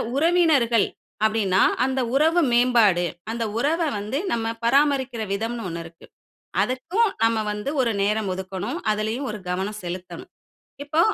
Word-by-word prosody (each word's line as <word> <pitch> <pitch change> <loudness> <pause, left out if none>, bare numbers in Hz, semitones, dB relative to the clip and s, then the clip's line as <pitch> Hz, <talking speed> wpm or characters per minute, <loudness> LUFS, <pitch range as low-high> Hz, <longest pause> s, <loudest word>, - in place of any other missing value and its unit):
உறவினர்கள் 295 - +3 0.4
அப்படின்னா 205 -4 +2 0.2
அந்த 265 0 0 0.2
உறவு 320 +5 +4
மேம்பாடு, 235 -7 +4 0.3
அந்த 230 0 -2
உறவ 305 +7 +1 0.2
வந்து 210 +7 -3
நம்ம 225 -1 -1 0.2
பராமரிக்கிற 265 -2 +2
விதம்ன்னு 225 +3 -3
ஒண்ணு 170 0 -5
இருக்கு. 165 0 -14 0.6
அதுக்கும் 345 - +1
நம்ம 225 0 +3
வந்து 210 +6 -4
ஒரு 240 - +2
நேரம் 210 0 0
ஒதுக்கணும். 190 - -4
அதுலயும் 215 +6 -1
ஒரு 210 - -5
கவனம் 195 +4 -3
செலுத்தணும். 180 +1 -7 0.5
இப்போ 310 +3 +1
230 Hz, 130 wpm, -23 LUFS, 205-275 Hz, 0.6 s, உறவு